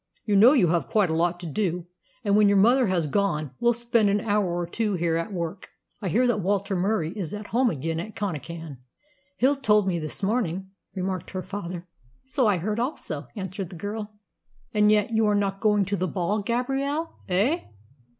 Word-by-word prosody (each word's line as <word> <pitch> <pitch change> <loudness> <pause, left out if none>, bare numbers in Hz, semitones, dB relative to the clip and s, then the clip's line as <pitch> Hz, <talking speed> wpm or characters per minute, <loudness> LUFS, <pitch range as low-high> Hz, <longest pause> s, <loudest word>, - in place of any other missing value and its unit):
"You 210 - +1
know 225 +7 +8
you 205 - +4
have 165 -4 0
quite 205 -6 +2
a - - 0
lot 175 +1 +1
to - - -7
do, 175 0 -1 0.4
and 205 -2 +2
when 210 0 +6
your 200 - +4
mother 240 +5 +5
has 180 -4 +1
gone 155 -4 0
we'll 240 - +4
spend 235 -2 +2
an 205 +1 +2
hour 205 -2 +1
or 175 0 -1
two 210 +3 -1
here 170 -2 0
at 165 +5 -2
work." 175 +1 -5 0.3
"I 200 - -2
hear 240 +10 +3
that 240 -4 +2
Walter 200 +1 0
Murie 180 -3 0
is 200 -2 -4
at 210 0 -7
home 250 +1 +4
again 160 0 -2
at 215 +5 -6
Connachan. 165 -6 -5 0.6
Hill 270 +4 +3
told 210 -6 +3
me 175 -2 0
this 155 +5 -5
morning," 190 -3 -1 0.2
remarked 185 -1 -3
her 185 -1 -4
father. 180 -3 -6 0.4
"So 265 -2 +1
I 205 -3 +3
heard 210 +6 -2
also," 185 - -3
answered 190 -2 -5
the 180 - -10
girl. 205 +4 -5 0.6
"And 210 -1 +4
yet 210 +1 +2
you 220 -1 +3
are 210 - +3
not 195 -1 0
going 210 -2 +3
to 200 +2 -1
the 185 -1 -1
ball, 200 +4 -1
Gabrielle, 270 +8 -1
eh?" 215 - +2
200 Hz, 200 wpm, -25 LUFS, 175-220 Hz, 0.6 s, know